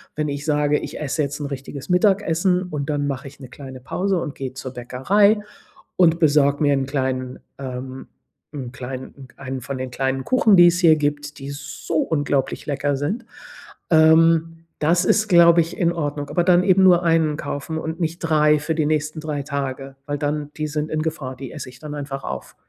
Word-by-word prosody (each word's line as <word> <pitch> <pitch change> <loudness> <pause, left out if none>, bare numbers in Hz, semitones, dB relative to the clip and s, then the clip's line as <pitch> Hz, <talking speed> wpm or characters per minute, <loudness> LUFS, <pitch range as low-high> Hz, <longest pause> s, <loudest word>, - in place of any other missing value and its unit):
wenn 150 0 -1
ich 140 +1 -5
sage: 150 -1 +2
„Ich - - -7
esse 150 +1 -2
jetzt 145 +1 -4
'n - - -3
richtiges 140 +1 -7
Mittagessen“ 180 -1 +2
und 150 -5 -5
dann 145 -1 -1
mache 135 -1 -4
ich 135 - -14
'ne 130 - -10
kleine 130 -1 -10
Pause 185 +9 -1
und 150 - -5
gehe 130 -1 -5
zur 130 -1 -7
Bäckerei 190 - +2 0.6
und 170 -2 +4
besorge 145 -2 +3
mir 145 -1 +4
'n 135 -1 0
kleinen, 130 -2 -3 0.2
ähm 130 0 -7 0.5
'n 130 -5 -6
kleinen 130 +1 -8
1 130 -1 -6
von 135 +2 -5
den 130 0 -5
kleinen 130 +1 -1
Kuchen, 225 -5 +4
die 175 0 +8
es 175 +1 +2
hier 165 -3 +6
gibt, 145 0 -3
die 135 +1 -7
so 145 +3 -6
unglaublich 145 -4 -1
lecker 145 -1 -1
sind. 200 - -3 0.6
Ähm, 165 0 +4
das 170 +4 +2
ist, 215 +3 +3
glaube 170 -2 +6
ich, 165 - -5
in 170 -1 +2
Ordnung. 145 -3 -3
Aber 175 - +1
dann 180 -1 +5
eben 190 0 +4
nur 180 -2 +6
1 165 -3 +2
kaufen 145 +3 -4
und 160 +2 -5
nicht 165 0 -2
3 150 -2 +3
für 160 +2 -2
die 155 -2 +1
nächsten 155 +1 -1
3 150 -2 -4
Tage, 135 -1 -4
weil 145 0 -3
dann 145 0 -3
die 155 0 -2
sind 150 +1 -3
in 155 0 -1
Gefahr. 150 -5 -4
Die 135 0 -8
esse 150 -5 -7
ich 125 0 -15
dann 150 +1 -7
einfach 140 -1 -6
auf. - - -6
150 Hz, 200 wpm, -21 LUFS, 135-165 Hz, 0.6 s, die